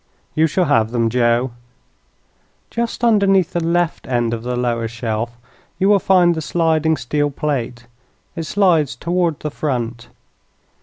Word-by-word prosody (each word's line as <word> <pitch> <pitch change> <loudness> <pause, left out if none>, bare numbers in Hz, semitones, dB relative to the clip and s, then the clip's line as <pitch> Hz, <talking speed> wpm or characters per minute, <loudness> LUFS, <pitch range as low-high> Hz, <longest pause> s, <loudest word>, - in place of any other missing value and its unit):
"You 160 +1 +3
shall 175 +4 +1
have 115 -7 +2
them, 115 -1 0
Joe." 120 +1 +2 1.2
"Just 235 0 -3
underneath 200 -6 +3
the 175 - -1
left 170 0 0
end 120 -2 0
of 115 - -3
the 125 +1 -3
lower 120 -2 -1
shelf 115 0 -4 0.4
you 195 - +2
will 205 -1 +5
find 180 -2 +4
the 160 - -4
sliding 160 -1 +1
steel 145 +5 -1
plate. 130 -5 -3 0.5
It 165 - -4
slides 170 -8 +2
toward 170 -3 -1
the 150 - -3
front. 120 -6 -3
150 Hz, 145 wpm, -19 LUFS, 120-175 Hz, 1.2 s, will